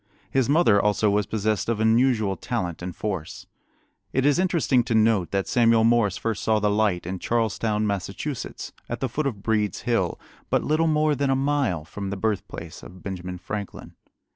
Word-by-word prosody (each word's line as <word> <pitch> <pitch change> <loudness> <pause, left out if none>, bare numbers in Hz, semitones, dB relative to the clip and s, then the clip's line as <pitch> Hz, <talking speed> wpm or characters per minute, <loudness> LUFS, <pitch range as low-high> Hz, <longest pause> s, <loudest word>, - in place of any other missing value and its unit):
His 135 -1 +1
mother 145 -10 +4
also 105 0 +2
was 105 -1 +1
possessed 110 0 -1
of 115 -2 0
unusual 110 -2 +3
talent 90 -10 -3
and 90 0 -5
force. 95 -7 -4 0.7
It 135 +1 +1
is 145 +3 +3
interesting 170 -9 +2
to 115 - 0
note 110 -5 +3
that 100 -1 -1
Samuel 115 -2 +4
Morse 115 -4 +3
first 110 -3 -2
saw 110 -1 +2
the 105 -1 +1
light 105 -5 +1
in 90 +1 -4
Charlestown, 110 -1 0
Massachusetts, 100 -3 -4 0.2
at 120 - -3
the 135 - -1
foot 140 +4 -2
of 105 -7 -5
Breed's 105 -2 0
Hill, 115 -8 0 0.3
but - - +1
little 155 +2 +2
more 155 -1 +2
than 140 0 0
a 135 - +3
mile 135 - 0
from 100 +4 -6
the 100 - -4
birthplace 95 -5 -4
of 90 0 -13
Benjamin 90 -2 -5
Franklin. 100 +2 -6
110 Hz, 180 wpm, -24 LUFS, 100-125 Hz, 0.7 s, mother